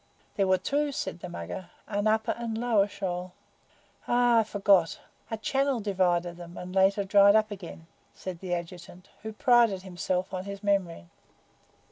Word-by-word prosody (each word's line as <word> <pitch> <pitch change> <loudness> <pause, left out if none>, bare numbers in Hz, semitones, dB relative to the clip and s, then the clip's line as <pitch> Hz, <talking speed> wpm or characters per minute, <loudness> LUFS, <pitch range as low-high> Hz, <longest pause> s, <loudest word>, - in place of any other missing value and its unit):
"There 195 -1 +1
were 185 0 +4
two," 285 +10 -1
said 190 -9 -4
the 180 - -7
Mugger; 175 +1 -7 0.2
"an 205 0 -1
upper 220 0 +2
and 230 -2 -4
a - - -3
lower 225 -4 +2
shoal." 180 -2 -5 0.7
"Ay, 240 -1 +4
I - - +3
forgot. 200 -5 +2 0.3
A 225 - -3
channel 270 +3 0
divided 180 -4 0
them, 175 0 -10
and 180 0 -7
later 195 +1 +3
dried 200 +1 +6
up 215 -1 +2
again," 175 -4 -9 0.3
said 185 -3 -7
the 180 -1 -2
Adjutant, 175 +1 -9
who 220 +1 -6
prided 230 -4 +3
himself 185 0 -3
on 185 0 -4
his 200 0 -7
memory. 190 - 0
195 Hz, 165 wpm, -28 LUFS, 180-220 Hz, 0.7 s, dried